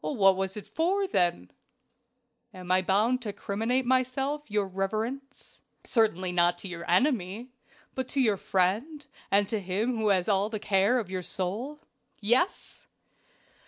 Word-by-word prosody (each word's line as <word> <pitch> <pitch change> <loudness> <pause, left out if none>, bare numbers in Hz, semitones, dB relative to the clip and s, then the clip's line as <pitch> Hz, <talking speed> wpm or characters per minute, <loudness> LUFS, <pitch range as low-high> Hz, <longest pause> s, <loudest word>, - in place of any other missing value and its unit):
"What 195 -8 +3
was 190 +1 -3
it 205 - -7
for 345 - 0
then?" 175 - 0 1.0
"Am 180 -1 -6
I 185 0 +4
bound 215 +7 +2
to 215 -3 -3
criminate 225 +6 -1
myself, 260 +3 0
your 210 -1 +1
reverence?" 220 +9 -4 0.2
"Certainly 190 -6 +1
not 175 0 +2
to 195 - -7
your 170 -2 -7
enemy! 225 - +1 0.4
but 260 -1 -3
to 280 - -1
your 220 -6 +3
friend, 215 - -1 0.2
and 200 0 +3
to 220 - -1
him 205 +6 -1
who 220 -1 0
has 190 -3 +3
the 205 +1 0
care 200 +5 +2
of 210 -7 -3
your 185 -1 -2
soul 210 - -3 0.4
yes!" 240 - -1
210 Hz, 145 wpm, -28 LUFS, 190-255 Hz, 1.0 s, I